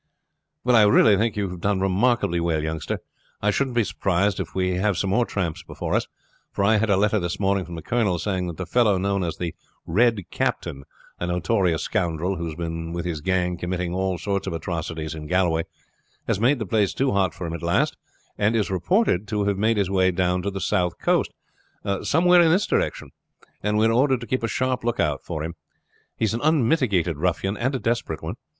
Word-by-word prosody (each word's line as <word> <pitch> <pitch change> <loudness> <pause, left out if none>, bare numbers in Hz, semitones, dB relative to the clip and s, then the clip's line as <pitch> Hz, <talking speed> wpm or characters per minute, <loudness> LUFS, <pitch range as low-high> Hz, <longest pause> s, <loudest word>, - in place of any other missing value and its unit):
"Well, 125 0 +3
I 115 - +7
really 105 0 +6
think 110 +2 0
you 100 -3 -1
have 90 -1 -8
done 100 0 +1
remarkably 95 -1 +1
well, 80 -2 0
youngster. 80 -1 -3 0.4
I 105 - +2
shouldn't 130 +3 -1
be 120 - +4
surprised 100 0 0
if 90 -4 -5
we 90 -1 0
have 100 -1 +1
some 95 - 0
more 120 +3 +2
tramps 85 -5 -2
before - - -5
us, - - +1 0.4
for 100 - -1
I 110 +2 +4
had 110 +1 0
a 100 - +4
letter 105 +2 +2
this 85 -1 -3
morning 100 -1 +1
from 85 - -8
the 80 - -7
colonel 110 -7 +1
saying 95 0 -2
that 85 - -6
the 90 - -4
fellow 105 +2 +3
known 100 0 0
as 85 -2 -3
the 85 -2 -3 0.3
Red 115 +5 +3
Captain, 70 0 -2 0.3
a 90 - -2
notorious 90 -1 +1
scoundrel 85 +3 -1
who 85 0 -3
has 80 - -6
been 80 0 -4
with 85 0 -3
his 80 -4 -3
gang 90 0 0
committing 90 0 -3
all 95 0 -1
sorts 100 +3 -2
of - - -2
atrocities 80 -1 -4
in 75 -1 -7
Galway, 85 -2 +1 0.6
has - - 0
made 130 +6 +3
the 110 - -3
place 100 0 +1
too 135 0 +1
hot 95 -4 +1
for 90 - -6
him 80 - -4
at 85 - -5
last, 85 0 +1 0.4
and 105 +2 +2
is 105 -3 0
reported 105 - +1
to 105 -1 -1
have 100 -1 0
made 110 +1 +2
his 100 -2 0
way 95 -1 +3
down 90 0 0
to 100 - -2
the 95 0 -5
south 90 -2 0
coast, - - +1 0.7
somewhere 175 +3 +4
in 165 - +5
this 185 +5 +3
direction; - - -1 0.5
and 105 +1 0
we 110 - +4
are 115 - +3
ordered 130 +1 +2
to - - -5
keep 130 +2 -1
a 115 - 0
sharp 130 +2 -1
lookout 85 - 0
for 80 -3 -4
him. 85 +2 -4 0.6
He - - +1
is 110 - 0
an 115 - -2
unmitigated 120 - +2
ruffian, 90 +4 0
and 130 +5 -1
a - - -1
desperate 115 -10 -2
one. - - -3
95 Hz, 220 wpm, -24 LUFS, 85-110 Hz, 0.7 s, I